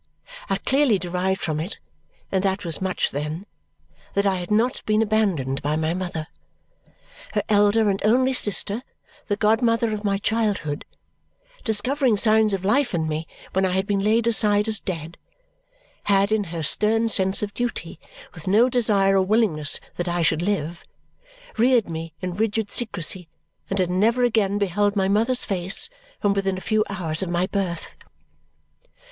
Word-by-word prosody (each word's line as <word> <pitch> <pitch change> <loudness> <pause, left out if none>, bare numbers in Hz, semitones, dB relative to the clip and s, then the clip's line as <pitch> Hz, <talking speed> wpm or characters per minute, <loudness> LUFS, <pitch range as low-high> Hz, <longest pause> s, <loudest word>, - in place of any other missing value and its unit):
I - - +1
clearly 270 -6 +2
derived 185 +2 -2
from 155 -2 -2
it 170 +6 -5 0.5
and 190 -1 0
that 195 0 -1
was 165 +1 -4
much 190 -1 -1
then 150 +6 -4 0.7
that 200 0 +2
I 195 -1 +2
had 175 -1 -6
not 225 +4 +1
been 215 +1 +3
abandoned 190 -12 0
by 150 +2 -1
my 160 +1 0
mother. 175 -4 -4 1.1
Her - - 0
elder 210 +1 +3
and 195 -1 0
only 255 +5 +3
sister, 210 -1 +2 0.5
the 205 - 0
godmother 225 +1 +2
of 210 0 -4
my 200 -1 +1
childhood, 205 -9 -1 0.8
discovering 240 +2 +1
signs 215 -1 +3
of 190 0 -6
life 245 +1 +2
in 160 -2 -1
me 155 +1 -3 0.3
when 190 - +1
I 185 -1 +1
had 190 +1 0
been 200 -1 0
laid 220 +2 +2
aside 210 -2 +3
as 215 -2 +2
dead, 165 -2 -6 0.9
had 200 0 +3
in 215 -2 +1
her 165 -2 -5
stern 220 +8 +3
sense 190 -2 +1
of 205 -1 -4
duty, 240 +2 -4 0.3
with - - -11
no 220 +6 +4
desire 205 -6 +2
or 190 - +4
willingness 185 -7 +1 0.2
that 175 - -2
I 175 0 0
should 160 0 +2
live, 175 -3 -2 0.7
reared 240 -1 +3
me 165 -1 -6
in 180 -1 -3
rigid 215 +1 -1
secrecy 180 -6 0 0.4
and 195 - -2
had 180 -2 +1
never 225 +7 +2
again 215 -4 +2
beheld 205 +1 +1
my 190 -1 +1
mother's 225 +6 +2
face 195 - +1 0.3
from 205 -1 +2
within 195 -1 -1
a - - -7
few 215 +1 +1
hours 170 -5 -1
of 190 - -3
my 175 +1 +1
birth. 190 -3 -3
200 Hz, 165 wpm, -23 LUFS, 180-220 Hz, 1.1 s, no